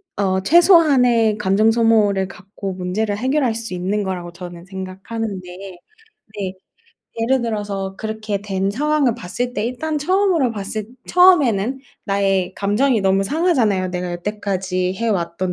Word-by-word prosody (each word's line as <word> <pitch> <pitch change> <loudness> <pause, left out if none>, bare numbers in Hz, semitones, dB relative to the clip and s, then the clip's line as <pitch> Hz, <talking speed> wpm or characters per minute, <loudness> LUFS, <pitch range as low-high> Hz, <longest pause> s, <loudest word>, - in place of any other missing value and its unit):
어 190 -2 0
최소한의 260 - +5
감정 210 +2 +3
소모를 215 -4 +2
갖고 195 0 -7
문제를 195 +3 -2
해결할 260 0 0
수 225 -3 -5
있는 190 +4 -1
거라고 180 -3 -4
저는 175 -1 -10
생각하는데 190 0 -6 0.8
네. 195 -2 -3 0.7
예를 255 +2 +1
들어서 205 -4 -3
그렇게 215 -2 -3
된 195 -1 -2
상황을 285 +1 +1
봤을 240 +3 -4
때 210 - -2
일단 300 +6 -3
처음으로 360 -4 +2
봤을 210 0 -5 0.2
처음에는 270 - +4 0.3
나의 195 -2 0
감정이 215 +3 +1
너무 195 0 +2
상하잖아요. 225 - +1
내가 180 -1 -4
여태까지 185 -1 -2
해 230 +4 -2
왔던 180 -2 -1
205 Hz, 310 characters per minute, -20 LUFS, 190-240 Hz, 0.8 s, 최소한의